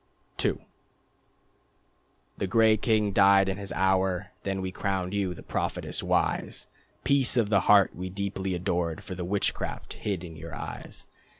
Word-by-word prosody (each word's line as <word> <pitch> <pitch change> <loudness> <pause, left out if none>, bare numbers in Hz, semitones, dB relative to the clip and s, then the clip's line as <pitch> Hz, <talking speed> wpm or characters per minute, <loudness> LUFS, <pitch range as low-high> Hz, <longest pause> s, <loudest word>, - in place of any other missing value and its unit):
II - - +1 1.8
The 100 - -1
gray 110 +1 +5
king 110 -1 +1
died 95 0 +5
in 95 0 -1
his 100 -1 -5
hour. 95 0 +1
Then 95 -1 -2
we 95 0 -3
crowned 95 -1 -2
you, 95 -3 -1
the - - -11
prophetess - - -3
wise: - - -1 0.4
Peace 135 -3 +4
of 110 -4 +2
the 100 -2 +4
Heart 100 -2 +6
we 90 +2 -5
deeply 95 -1 -3
adored 90 0 -2
For 100 -2 -7
the 90 0 -5
witchcraft 100 +3 -2
hid 95 -4 -3
in 85 -2 -9
your 80 +1 -8
eyes. - - -7
95 Hz, 155 wpm, -27 LUFS, 90-100 Hz, 1.8 s, Heart